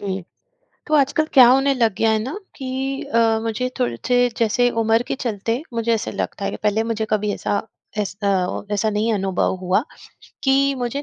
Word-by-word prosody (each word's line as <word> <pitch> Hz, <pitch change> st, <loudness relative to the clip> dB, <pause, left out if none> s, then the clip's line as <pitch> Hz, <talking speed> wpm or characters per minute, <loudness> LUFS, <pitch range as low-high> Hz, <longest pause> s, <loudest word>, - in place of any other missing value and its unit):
जी, 195 Hz, -1 st, -3 dB, 0.7 s
तो 310 Hz, -, -2 dB
आजकल 295 Hz, +2 st, +2 dB
क्या 255 Hz, -4 st, +9 dB
होने 270 Hz, +3 st, +4 dB
लग 230 Hz, -5 st, +2 dB
गया 225 Hz, -, +3 dB
है 220 Hz, -, +2 dB
ना 270 Hz, -, -5 dB, 0.2 s
कि 270 Hz, 0 st, -3 dB
अ, 225 Hz, -1 st, +2 dB
मुझे 230 Hz, +3 st, -2 dB
थोड़े 120 Hz, -1 st, 0 dB
से 245 Hz, 0 st, +3 dB, 0.2 s
जैसे 240 Hz, +2 st, +2 dB
उम्र 225 Hz, +1 st, +2 dB
के -, -, -1 dB
चलते, 230 Hz, 0 st, -2 dB
मुझे 230 Hz, 0 st, +1 dB
ऐसा 225 Hz, -, -2 dB
लगता 200 Hz, -, -4 dB
है 195 Hz, -, -1 dB
कि -, -, -6 dB
पहले 210 Hz, +1 st, +2 dB
मुझे 225 Hz, -1 st, -2 dB
कभी 210 Hz, -1 st, 0 dB
ऐसा 205 Hz, -, -1 dB, 0.4 s
एस 200 Hz, -2 st, -2 dB
अ, 190 Hz, -2 st, 0 dB
ऐसा 205 Hz, +2 st, +1 dB
नहीं 215 Hz, +2 st, 0 dB
अनुभव 190 Hz, -2 st, 0 dB
हुआ 185 Hz, +5 st, +1 dB, 0.6 s
कि 275 Hz, +1 st, +3 dB
मुझे 245 Hz, +3 st, -3 dB
225 Hz, 190 wpm, -21 LUFS, 205-255 Hz, 0.7 s, क्या